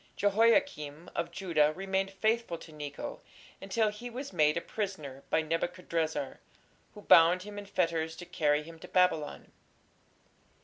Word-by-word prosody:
" -, -, -36 dB
Jehoiakim 205 Hz, -, +2 dB
of -, -, -1 dB
Judah 165 Hz, -6 st, +2 dB
remained 195 Hz, 0 st, -1 dB
faithful 220 Hz, -1 st, 0 dB
to 165 Hz, -, -13 dB
Necho 145 Hz, -1 st, -6 dB, 0.4 s
until 215 Hz, +3 st, +1 dB
he 210 Hz, +4 st, -7 dB
was 255 Hz, 0 st, -7 dB
made 150 Hz, -2 st, +3 dB
a -, -, -1 dB
prisoner 155 Hz, -12 st, -5 dB
by 160 Hz, -, +2 dB
Nebuchadrezzar, 165 Hz, -3 st, -2 dB, 0.6 s
who 210 Hz, -, -10 dB
"bound 170 Hz, +2 st, +6 dB
him 205 Hz, 0 st, -7 dB
in 200 Hz, -, -9 dB
fetters 165 Hz, -4 st, 0 dB
to 175 Hz, -, -9 dB
carry 150 Hz, -3 st, +1 dB
him 165 Hz, +1 st, -12 dB
to -, -, -10 dB
Babylon". 180 Hz, -5 st, +1 dB
175 Hz, 145 wpm, -31 LUFS, 155-205 Hz, 0.6 s, bound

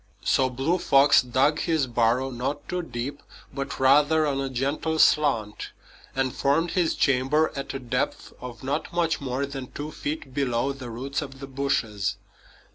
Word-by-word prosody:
So 130 Hz, -1 st, +2 dB
Blue 135 Hz, +8 st, 0 dB
Fox 140 Hz, -2 st, +5 dB
dug 130 Hz, +5 st, +2 dB
his 160 Hz, -5 st, +1 dB
burrow 120 Hz, +2 st, +1 dB
not 130 Hz, +4 st, -4 dB
too 180 Hz, 0 st, -2 dB
deep, 140 Hz, -2 st, -5 dB, 0.3 s
but 140 Hz, 0 st, -4 dB
rather 145 Hz, +4 st, +4 dB
on 140 Hz, -2 st, 0 dB
a 135 Hz, -, -2 dB
gentle 140 Hz, +5 st, -1 dB
slant, 125 Hz, -10 st, +2 dB, 0.5 s
and 130 Hz, -1 st, 0 dB
formed 165 Hz, +5 st, +1 dB
his 175 Hz, -3 st, +1 dB
chamber 135 Hz, +3 st, +2 dB
at 135 Hz, -1 st, -5 dB
a -, -, 0 dB
depth 125 Hz, -3 st, -3 dB
of 120 Hz, -2 st, -8 dB
not 140 Hz, +4 st, -2 dB
much 170 Hz, -3 st, 0 dB
more 135 Hz, +1 st, -2 dB
than 135 Hz, -2 st, -6 dB
two 150 Hz, +1 st, -6 dB
feet 145 Hz, -3 st, -5 dB
below 135 Hz, -1 st, 0 dB
the 130 Hz, -3 st, -8 dB
roots 135 Hz, +5 st, -3 dB
of 135 Hz, -2 st, -8 dB
the 135 Hz, -, -6 dB
bushes. 130 Hz, -7 st, -1 dB
135 Hz, 165 wpm, -25 LUFS, 130-150 Hz, 0.5 s, Fox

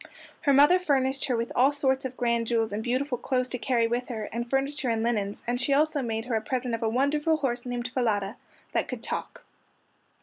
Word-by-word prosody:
Her 290 Hz, -, +3 dB
mother 290 Hz, +7 st, +6 dB
furnished 270 Hz, -5 st, +1 dB
her 250 Hz, -3 st, 0 dB
with 230 Hz, +1 st, -2 dB
all 265 Hz, +3 st, +5 dB
sorts 265 Hz, -2 st, 0 dB
of 260 Hz, 0 st, -5 dB
grand 235 Hz, -2 st, +1 dB
jewels 225 Hz, -2 st, +1 dB
and 205 Hz, +2 st, -2 dB
beautiful 255 Hz, +1 st, -1 dB
clothes 255 Hz, -1 st, 0 dB
to 250 Hz, -, -3 dB
carry 240 Hz, -2 st, +2 dB
with 240 Hz, +2 st, -1 dB
her, 225 Hz, -4 st, -4 dB
and 235 Hz, +1 st, -3 dB
furniture 270 Hz, 0 st, 0 dB
and 225 Hz, -1 st, 0 dB
linens, 210 Hz, -4 st, -1 dB
and 245 Hz, +1 st, -1 dB
she 275 Hz, +3 st, +2 dB
also 300 Hz, 0 st, +2 dB
made 225 Hz, -2 st, -3 dB
her 245 Hz, -, -3 dB
a 220 Hz, -, +1 dB
present 250 Hz, +1 st, -2 dB
of 230 Hz, -, -2 dB
a 225 Hz, -, +1 dB
wonderful 295 Hz, +6 st, +2 dB
horse 250 Hz, -4 st, -2 dB
named 245 Hz, 0 st, -3 dB
Falada, 215 Hz, -4 st, 0 dB, 0.4 s
that -, -, 0 dB
could -, -, -6 dB
talk. -, -, -5 dB
245 Hz, 215 wpm, -27 LUFS, 230-270 Hz, 0.4 s, mother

